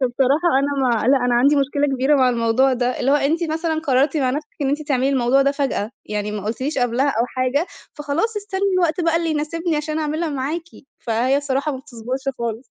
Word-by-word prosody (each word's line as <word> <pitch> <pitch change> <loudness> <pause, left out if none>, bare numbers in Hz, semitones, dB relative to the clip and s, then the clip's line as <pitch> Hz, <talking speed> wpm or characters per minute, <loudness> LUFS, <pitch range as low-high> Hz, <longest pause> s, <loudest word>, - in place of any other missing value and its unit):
فبصراحة 265 +6 +2
أنا 275 -1 0
ما 230 - +1
لأ، 275 - +6
أنا 245 -1 +2
عندي 280 +5 +4
مشكلة 285 +1 +1
كبيرة 265 +3 +2
مع 260 -2 +4
الموضوع 240 +2 +2
ده، 250 0 -1
اللي 265 - +1
هو 285 - +5
أنتِ 310 +4 0
مثلًا 320 0 -1
قررتِ 280 0 +1
مع 265 -4 +1
نَفْسِك 300 +3 -4
إن 275 - +1
أنتِ 290 +2 -1
تعملي 265 -1 +2
الموضوع 270 0 +3
ده 275 - +2
فجأة، 275 -7 -2
يعني 210 0 -3
ما 210 -2 -5
قُلتيليش 260 +7 -2
قبلها 245 +3 +1
أو 235 -3 0
حاجة، 255 +6 -1 0.3
فخلاص 300 +10 -2
استنّي 400 -2 -4
الوقت 345 -2 +1
بقى 330 -1 +2
اللي 335 -1 0
يناسبني 315 +2 -1
عشان 305 +1 -2
اعملها 310 +2 -1
معاكِ، 290 +4 -3 0.3
فهي 240 +4 +1
الصراحة 285 +1 -1
ما 265 - -5
بتصبُرش 255 -1 -6 0.2
خالص. 235 +1 -4
275 Hz, 205 wpm, -21 LUFS, 250-305 Hz, 0.3 s, لأ